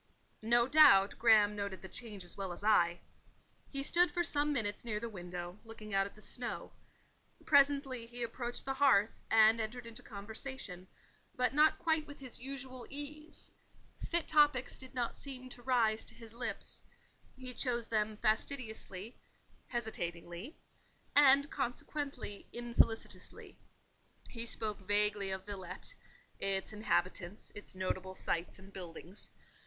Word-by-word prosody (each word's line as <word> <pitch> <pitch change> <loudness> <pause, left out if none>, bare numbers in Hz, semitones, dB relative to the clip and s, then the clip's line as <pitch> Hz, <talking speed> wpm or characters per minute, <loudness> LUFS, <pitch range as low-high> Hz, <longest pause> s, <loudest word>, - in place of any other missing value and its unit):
No 235 +2 +4
doubt 205 -10 +7
Graham 215 -3 +6
noted 200 -2 -4
the - - -4
change 210 -3 -5
as 175 - -5
well 195 -2 -4
as 175 - -8
I. 175 -5 +4 0.7
He 275 -1 -2
stood 350 +5 +5
for 350 -1 0
some 295 -2 +1
minutes 210 -7 -1
near 220 -3 -1
the 235 - -4
window, 180 -2 -7
looking 220 -2 -9
out 195 0 +3
at - - -15
the 215 - -15
snow; 245 -1 -4 0.7
presently 275 -4 +3
he, 240 +1 -3
approached 240 +1 -3
the 270 - -1
hearth, 265 -7 +5 0.2
and 225 +1 +6
entered 235 +3 -5
into 230 +1 -7
conversation, 205 -3 -6 0.5
but 250 +1 +2
not 305 +2 +5
quite 320 -1 0
with 285 - -10
his 260 -3 -8
usual 265 -1 -6
ease: 300 +2 -6 0.5
fit 340 -1 -1
topics 295 -4 +4
did 260 0 -10
not 240 -2 -1
seem 255 -2 -8
to 245 - -8
rise 235 -4 +2
to - - -8
his 230 -1 -12
lips; 240 +1 -4 0.5
he 255 -1 -5
chose 240 -2 0
them 215 -1 0
fastidiously, 220 -2 -2 0.5
hesitatingly, 175 - -3 0.6
and 280 0 +7
consequently 260 -3 -4
infelicitously: 235 -2 -1 0.7
he 230 -1 -5
spoke 215 -2 -2
vaguely 205 0 +2
of 190 0 -3
Villette—its 195 0 -5
inhabitants, 190 -2 -1
its 205 - -9
notable 185 0 -3
sights 170 -1 0
and 195 +1 -15
buildings. 180 +2 -9
225 Hz, 140 wpm, -34 LUFS, 200-260 Hz, 0.7 s, doubt